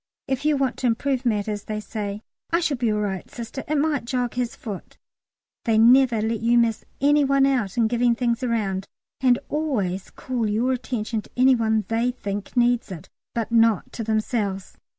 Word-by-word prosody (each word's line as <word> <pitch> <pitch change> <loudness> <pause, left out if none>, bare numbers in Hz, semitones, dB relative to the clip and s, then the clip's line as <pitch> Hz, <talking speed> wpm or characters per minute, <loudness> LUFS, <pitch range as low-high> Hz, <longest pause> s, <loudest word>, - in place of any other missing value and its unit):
If 265 +1 -2
you 300 -1 +3
want 270 -2 0
to 255 - 0
improve 255 +2 0
matters 210 -2 -1
they 215 -1 -3
say, 210 -1 -5 0.3
"I 335 - +2
shall 310 -6 0
be 235 -2 +1
all 210 0 0
right, 195 -3 -3
Sister, 240 +3 -7
it 305 +1 0
might 290 -4 0
jog 245 -1 -1
his 245 -1 -2
foot." 205 -5 -8 0.7
They 225 -2 +3
never 240 -1 +5
let 225 0 -1
you 235 +1 +3
miss 230 -2 +2 0.2
any 290 +1 +4
one 275 0 +3
out 245 -8 0
in 230 -2 +4
giving 240 +1 +2
things 235 0 0
round, 205 -6 -1 0.3
and 250 -2 +4
always 210 - -2
call 240 -4 -3
your 230 +5 +1
attention 235 -3 -2
to - - -19
any 260 +1 +6
one 220 -3 +1
they 230 +2 +1
think 205 -2 -5
needs 240 -3 +2
it, 165 -4 -8 0.3
but 230 -1 -2
not 225 -4 +3
to 230 - -4
themselves. 215 -3 -2
235 Hz, 190 wpm, -24 LUFS, 215-255 Hz, 0.7 s, any